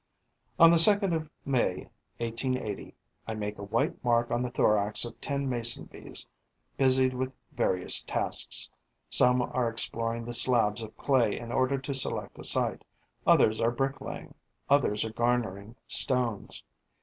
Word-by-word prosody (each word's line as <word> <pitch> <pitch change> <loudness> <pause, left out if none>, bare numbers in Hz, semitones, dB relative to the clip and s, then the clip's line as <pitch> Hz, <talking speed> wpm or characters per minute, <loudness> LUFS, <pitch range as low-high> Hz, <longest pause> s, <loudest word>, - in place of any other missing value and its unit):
On 165 -1 +8
the 170 - +5
2nd 200 +1 +5
of 155 -2 -3 0.2
May 130 -3 -1 0.3
1880, 115 -2 -4 0.3
I 110 - -4
make 105 -1 -5
a - - -6
white 110 +3 -2
mark 120 -1 +1
on 120 - 0
the 125 - -2
thorax 105 -2 +2
of 120 - -10
ten 140 -1 -3
Mason 120 -2 0
bees - - -5 0.5
busied 130 -1 +3
with 130 +1 -3 0.2
various 90 -1 +2
tasks: - - 0 0.4
some 125 0 +4
are 125 -1 -1
exploring 115 0 -1
the 120 - -6
slabs 115 -3 +3
of 110 -1 -10
clay 125 -6 +1
in 120 0 -7
order 130 +2 +1
to 135 +1 -5
select 135 - -2
a - - -8
site; - - +1 0.4
others 110 0 +4
are 115 - +3
brick 135 +3 -2
laying; - - -8 0.4
others 115 -7 +2
are 110 - -6
garnering 115 -3 -2
stores. 125 -6 0
120 Hz, 150 wpm, -28 LUFS, 115-130 Hz, 0.5 s, On